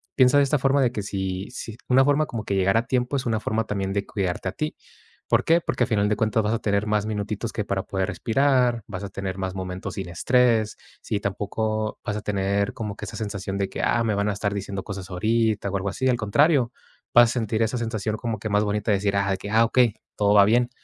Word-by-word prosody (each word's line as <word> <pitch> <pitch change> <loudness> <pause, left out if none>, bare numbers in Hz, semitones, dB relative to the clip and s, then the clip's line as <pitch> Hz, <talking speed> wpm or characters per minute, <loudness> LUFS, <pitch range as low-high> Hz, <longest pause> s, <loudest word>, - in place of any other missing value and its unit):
piensa 130 +1 +5
de 145 - +6
esta 140 +2 +2
forma 135 +2 +3
de 125 -3 +2
que 110 - -3
si 95 -1 -3
si 115 -3 -7
una 130 +1 +5
forma 145 +2 +3
como 115 -7 -5
que 100 - -3
llegar 95 +1 +2
a 115 - +1
tiempo 125 +2 0
es 135 - -1
una 115 -2 0
forma 110 +1 -1
también 95 -2 -2
de 100 0 -1
cuidarte 95 -2 -2
a - - -4
ti, 155 +10 -4 0.5
¿por - - +3
qué? 165 +1 +4
Porque, 125 - 0
al - - -11
final 105 -4 +1
de 105 - +1
cuentas, 110 0 +1
vas 105 +1 0
a 115 - 0
tener 100 0 0
más 105 0 +1
minutitos 105 +1 -3
que 105 - -2
para 100 -1 -2
poder 95 -2 -2
respirar, 125 -1 +2
vas 100 -2 -6
a - - -6
tener 95 -1 -5
más 95 -1 -3
momentos 95 -1 -5
sin 95 -2 -5
estrés. 115 +4 +2 0.3
Sí, 100 - -3
tampoco 110 +2 -2
vas 105 - -2
a - - -4
tener 100 -1 0
como 105 -4 -5
que - - -6
esa - - -8
sensación 100 -3 -4
de 100 -1 -1
que, - - -5
ah, 120 - +2
me 110 -2 0
van 100 +1 0
a - - 0
estar 100 +1 -2
diciendo 100 -1 -4
cosas 95 -2 -7
ahorita 110 +2 0
o 100 - -1
algo 95 +1 -3
así. 130 +7 0
Al 125 - +2
contrario, 125 +4 +2 0.4
vas 120 -1 +7
a - - -2
sentir 115 -2 -1
esa 115 +3 -1
sensación 110 -2 -2
como 115 -3 -3
que 110 - -4
más 105 0 +2
bonita 105 +1 0
de 100 - +3
decir: 100 0 0
"Ah, 100 0 +1
de 95 - 0
que, 100 - -7
ah, 115 +1 +5
okey, 120 -2 +3 0.2
todo 100 0 +3
va 100 -1 +7
bien". 120 +3 +3
105 Hz, 255 wpm, -24 LUFS, 100-120 Hz, 0.5 s, vas